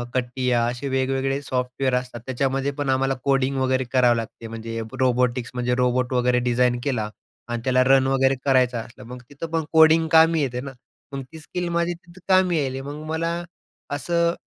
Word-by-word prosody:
CATIA 125 0 0
असे 125 +3 -5
वेगवेगळे 135 +1 0
software 130 -1 -2
असतात 125 -1 -3
त्याच्यामध्ये 135 +2 -1
पण 145 -2 -2
आम्हाला 135 +1 +2
कोडिंग 135 0 +1
वगैरे 130 0 +1
करावं 125 -2 +4
लागते. 115 0 -6
म्हणजे 115 0 -6 0.2
रोबोटिक्स 125 -1 +1
म्हणजे 125 0 0
रोबोट 125 0 +1
वगैरे 125 0 +2
डिझाइन 120 0 +2
केला 115 -7 -1 0.4
आणि 120 -1 -3
त्याला 130 0 +3
रन 135 0 +4
वगैरे 135 0 +2
करायचं 130 -3 +3
असलं, 120 +3 -10
मग 125 +1 -9
तिथं 145 +4 -6
पण 165 -1 0
कोडिंग 160 0 +6
कामी 160 0 +6
येते 125 -3 -2
ना. 140 0 -7 0.4
मग 135 - -4
ती 160 - -10
स्किल 175 +2 -4
माझी 170 +1 0
तिथं 170 +1 -16
कामी 180 -6 +3
आली. 130 0 -4
मग 145 +2 -7
मला 165 +1 -1 0.6
असं 170 +3 +1
130 Hz, 175 wpm, -23 LUFS, 125-145 Hz, 0.6 s, कोडिंग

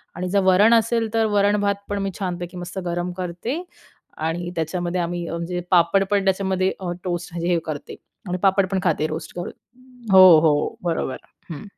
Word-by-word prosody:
आणि 180 +1 -3
जर 200 +2 +2
वरण 195 +5 +5
असेल 230 -1 +1
तर 225 -1 +2
वरण-भात 205 0 +2
पण 205 0 -2
मी 195 - -2
छानपैकी 180 -2 -4
मस्त 180 +2 -7
गरम 175 +1 -2
करते 185 - -4 0.6
आणि 170 +2 -3
त्याच्यामध्ये 175 +2 -2
आम्ही 175 0 -3
म्हणजे 170 +1 -3
पापड 180 +2 +4
पण 200 -1 +2
त्याच्यामध्ये 190 -1 +1
अ, 180 -2 -4
टोस्ट 175 -1 -4
म्हणजे 170 0 -3
हे 170 - +2
करते 155 -3 -6 0.3
आणि 180 +1 -2
पापड 195 0 +3
पण 190 - +1
खाते, 155 -3 +1
रोस्ट 155 +1 -7
करून 175 - -5 0.6
हो, 185 -4 +9
हो, 150 -2 +1
बरोबर, 165 -6 -2 0.3
हं. 150 - -7
180 Hz, 175 wpm, -22 LUFS, 170-195 Hz, 0.6 s, हो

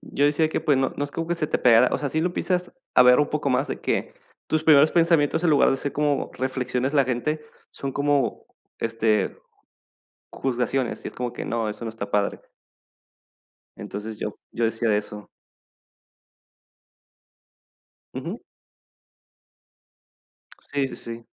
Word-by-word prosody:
yo 140 - -1
decía 155 +2 +3
que, - - -2
pues, 145 - +2
no 135 0 +1
no 145 - -1
es 140 - -7
como 165 0 -4
que 175 - 0
se 155 - -1
te - - -1
pegara 125 0 +6
o - - +1
sea, 145 - -2
sí 155 - -2
lo 175 +1 0
piensas 180 -1 -1 0.2
a - - +8
ver 125 +3 +7
un 145 - +1
poco 150 -2 -1
más 130 +2 +1
de - - -4
que - - -1 0.4
tus 155 0 0
primeros 155 -1 +7
pensamientos, 165 -2 +3
en 170 - +4
lugar 145 - +5
de 135 - +1
ser 140 +1 -4
como 145 -1 0
reflexiones 130 0 -1
de 150 - 0
la 140 - +5
gente, 130 +5 -1 0.3
son 135 -1 -5
como, 145 -3 0 0.4
este, 110 -3 0 0.9
juzgaciones, 125 0 -1
y - - -3
es - - -14
como 125 -1 -3
que - - -6
no, 115 -2 -1
eso 115 - -8
no - - -3
está 110 -2 -6
padre. 100 -1 0 1.4
Entonces, 105 +1 -7
yo 105 - -4 0.2
yo 115 - -1
decía 115 +1 0
de 105 -1 +3
eso. 105 0 -8 2.9
Ujú. - - -5 2.3
Sí, 140 -2 +1
sí, - - -8
sí. 115 0 -8
135 Hz, 165 wpm, -24 LUFS, 115-150 Hz, 2.9 s, a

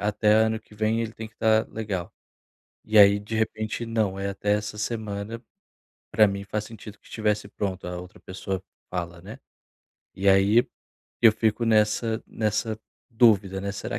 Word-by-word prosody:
até 105 +1 +2
ano 110 +1 +3
que 110 - -20
vem 110 +2 0
ele 115 -1 -4
tem 110 0 -8
que 110 - -31
tá 110 -1 +3
legal". 100 -6 -4 0.7
E 110 0 +3
aí, 100 0 +8
de 105 +2 -7
repente, 110 +1 -2
não, 110 -4 -1
é 100 0 -2
até 105 +1 -1
essa 105 0 -2
semana, 110 0 -4 0.7
pra 110 -1 +5
mim 100 0 -4
faz 105 +1 -3
sentido 105 -2 -11
que - - -25
estivesse 105 -2 -1
pronto, 95 -2 -4
a 90 0 -5
outra 90 0 -13
pessoa 95 0 -5 0.3
fala, 85 -1 -5
né. 105 +4 -10 0.8
E 95 +1 -2
aí 100 +4 +5 0.6
eu 115 -2 +8
fico 110 +1 0
nessa 110 0 +2
nessa 110 0 -2 0.3
dúvida, 105 -5 +3
né, 100 0 -3
"Será 100 - -4
105 Hz, 165 wpm, -25 LUFS, 100-110 Hz, 0.8 s, aí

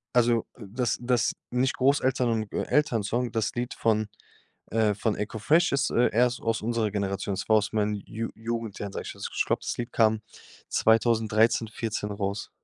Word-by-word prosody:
Also, 120 -1 +3
dass 115 +2 -2
dass 120 -2 +1 0.2
nicht 130 +2 +1
Großeltern 130 -2 +2
und 110 -2 -2
Elternsong. 120 -4 0
Das 110 -2 -1
Lied 120 +1 -2
von, 110 -2 +1 0.6
äh 110 -2 +2
von 105 +1 -1
Eko 105 +1 -4
Fresh 165 +10 +3
ist, 140 - +1
äh, 120 - +3
erst 125 +1 +3
aus 115 -1 -1
unserer 115 -2 0
Generation. 100 -1 -2
Es 95 - -5
war 110 - +6
aus 105 +1 -1
meinen 105 -1 +1
Ju 115 +1 -4
Jugendjahren, 110 -3 -4
sage - - -5
ich - - -7
jetzt. - - -8
Also, - - -14
ich - - +2
glaube - - 0
das - - -2
Lied 120 +1 -4
kam 110 -1 +3 0.5
2013- 110 0 +3
14 110 -1 -4
raus. 100 0 -3
115 Hz, 180 wpm, -27 LUFS, 105-120 Hz, 0.6 s, war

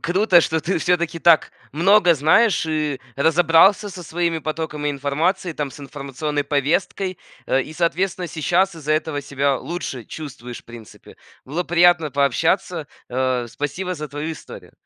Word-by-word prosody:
круто, 185 0 +4
что 160 - -1
ты 185 +5 -2
всё-таки 170 -1 0
так 165 -1 +4 0.2
много 180 +2 +4
знаешь 165 - +3
и 155 -3 -1 0.2
разобрался 165 +7 +4
со 180 -1 -9
своими 170 0 -1
потоками 155 -1 -3
информации, 150 +6 -1
там, 150 -2 -3
с 145 - -12
информационной 145 +1 -4
повесткой 160 +6 -1 0.3
э, 135 - +2
и, - - -9
соответственно, 180 +2 -1
сейчас 175 +5 +1
из-за 155 -2 -2
этого 155 -2 -1
себя 140 0 0
лучше 135 -5 -5
чувствуешь, 125 -5 -8
в - - -44
принципе. 115 -2 -13 0.3
Было 160 +7 -3
приятно 175 -2 +4
пообщаться, 140 -3 0 0.2
а, 130 -1 -1
спасибо 145 +9 -4
за 150 -2 -6
твою 145 +3 -4
историю! 155 - -12
155 Hz, 145 wpm, -21 LUFS, 140-175 Hz, 0.3 s, круто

